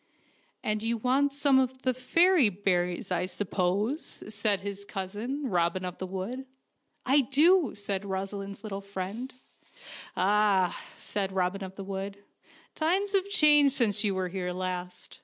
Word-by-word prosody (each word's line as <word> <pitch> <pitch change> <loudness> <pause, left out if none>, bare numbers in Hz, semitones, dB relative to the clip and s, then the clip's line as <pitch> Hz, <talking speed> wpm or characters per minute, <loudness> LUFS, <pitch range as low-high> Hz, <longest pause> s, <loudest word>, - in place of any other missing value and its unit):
And 215 0 -1
you 230 +1 0
want 265 +5 +2
some 280 -1 +3
of 260 0 -1
the 255 - +2
fairy 330 - +4
berries, 180 -2 -1
I 180 0 0
suppose," 205 - -2
said 205 -1 +1
his 200 0 -6
cousin, 210 +9 -4
Robin 180 -2 0
of 180 -1 -6
the 185 - -4
Wood. 205 +9 -5 0.6
"I 275 +2 +5
do," 305 +4 +4
said 200 -1 -3
Rosaleen's 195 +1 -5
little 200 -2 -5
friend. 200 +6 -5 0.9
"Ah," 195 -1 +3 0.2
said 195 -2 -3
Robin 190 +1 -1
of 190 0 -8
the 195 - -7
Wood, 195 +1 -5 0.6
'Mimes 375 +6 +1
have 395 -1 +1
changed 295 -7 +5
since 215 -5 +2
you 200 -2 +1
were 185 -1 -1
here 180 -1 -3
last. 180 0 -5
205 Hz, 145 wpm, -28 LUFS, 190-260 Hz, 0.9 s, I